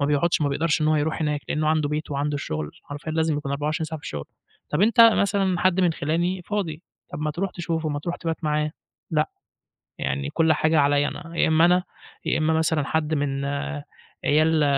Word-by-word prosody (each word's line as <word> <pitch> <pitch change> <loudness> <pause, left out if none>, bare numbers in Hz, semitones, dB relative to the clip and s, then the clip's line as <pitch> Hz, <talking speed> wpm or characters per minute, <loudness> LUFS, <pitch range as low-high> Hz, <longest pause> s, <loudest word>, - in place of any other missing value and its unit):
ما 140 - +2
بيقعدش، 150 +4 +2
ما 145 - +2
بيقدرش 155 +3 +1
إن 155 - +2
هو 155 - +3
يروح 155 +2 -1
هناك. 150 -1 0
لأنه 155 0 0
عنده 155 -2 +2
بيته 150 -1 -3
وعنده 145 +1 -1
الشغل، 75 - -3
حرفيًا 145 +2 -6
لازم 160 -1 +1
يكون 145 -2 -3
24 150 +3 -1
ساعة 160 0 -5
في - - -17
الشُغل. 75 -1 -5 0.5
طَب 150 - 0
أنت 230 +2 +4
مثلًا 200 -5 +4
حد 185 0 +3
من 175 -3 +3
خِلاني 175 +5 -1
فاضي، 170 -6 -3 0.3
طَب - - -5
ما 150 - 0
تروح 180 +5 -2
تشوفه، 165 -2 -2
ما 145 -1 -2
تروح 170 +4 -4
تِبات 165 -1 -4
معاه 150 0 +1 0.4
لأ، 155 -2 +1 0.7
يعني 70 0 -2
كل 160 -1 +3
حاجة 155 +1 +2
عليَّ 145 0 +3
أنا، 165 0 -7
يا - - +4
إمّا 160 +1 +5
أنا 180 +1 +4 0.4
يا - - +1
إمّا 160 0 +2
مثلًا 160 -1 +1
حد 160 +1 0
من 140 -2 -1 0.8
عيال 155 +1 +3
155 Hz, 205 wpm, -24 LUFS, 145-165 Hz, 0.8 s, إمّا